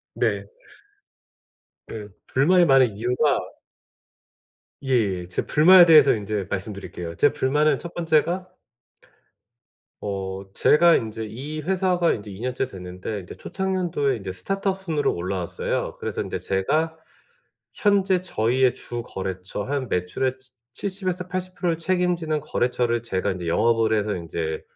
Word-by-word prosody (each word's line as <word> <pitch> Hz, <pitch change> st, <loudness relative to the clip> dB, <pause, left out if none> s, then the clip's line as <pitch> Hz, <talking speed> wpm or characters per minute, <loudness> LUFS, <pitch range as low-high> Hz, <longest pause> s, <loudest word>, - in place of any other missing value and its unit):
네. -, -, 0 dB, 1.5 s
예. 105 Hz, -2 st, -6 dB, 0.2 s
불만이 175 Hz, +7 st, +4 dB
많은 130 Hz, -7 st, +4 dB
이유가 125 Hz, +6 st, +1 dB, 1.4 s
예예. 105 Hz, -9 st, 0 dB
제 90 Hz, -, -3 dB
불만에 175 Hz, +4 st, +7 dB
대해서 155 Hz, -4 st, +7 dB
인제 105 Hz, -2 st, -3 dB
말씀드릴게요. 95 Hz, -4 st, -5 dB
제 145 Hz, -, +4 dB
불만은 150 Hz, +3 st, +2 dB
1 170 Hz, -, -8 dB
번째가 175 Hz, +2 st, +1 dB, 1.5 s
어 95 Hz, -1 st, -4 dB
제가 170 Hz, +2 st, +5 dB
인제 110 Hz, 0 st, -2 dB
이 140 Hz, +8 st, -6 dB
회사가 180 Hz, 0 st, +1 dB
인제 105 Hz, -1 st, -7 dB
2 95 Hz, 0 st, -9 dB
년째 125 Hz, +1 st, -1 dB
됐는데 95 Hz, -1 st, -6 dB
이제 90 Hz, -, -10 dB
초창년도에 175 Hz, -9 st, -1 dB
인제 95 Hz, -2 st, -6 dB
스타트업 195 Hz, -, -2 dB
순으로 160 Hz, -5 st, 0 dB
올라왔어요. 90 Hz, 0 st, -3 dB
그래서 -, -, -3 dB
인제 -, -, -3 dB
제가 155 Hz, +12 st, 0 dB, 0.8 s
현재 195 Hz, -3 st, +2 dB
저희의 130 Hz, -6 st, +1 dB
주거래처 95 Hz, -5 st, -5 dB
한 135 Hz, 0 st, -2 dB
매출의 125 Hz, +9 st, -1 dB
치 130 Hz, 0 st, -17 dB, 0.2 s
칠십에서 185 Hz, -, -3 dB
80% 185 Hz, 0 st, -3 dB
를 165 Hz, -, -1 dB
책임지는 170 Hz, -3 st, 0 dB
거래처를 120 Hz, -4 st, 0 dB
제가 100 Hz, -3 st, -1 dB
인제 90 Hz, -2 st, -5 dB
영업을 115 Hz, +4 st, +2 dB
해서 105 Hz, 0 st, -1 dB
인제 80 Hz, -2 st, -4 dB
130 Hz, 280 characters per minute, -24 LUFS, -, 1.5 s, 불만에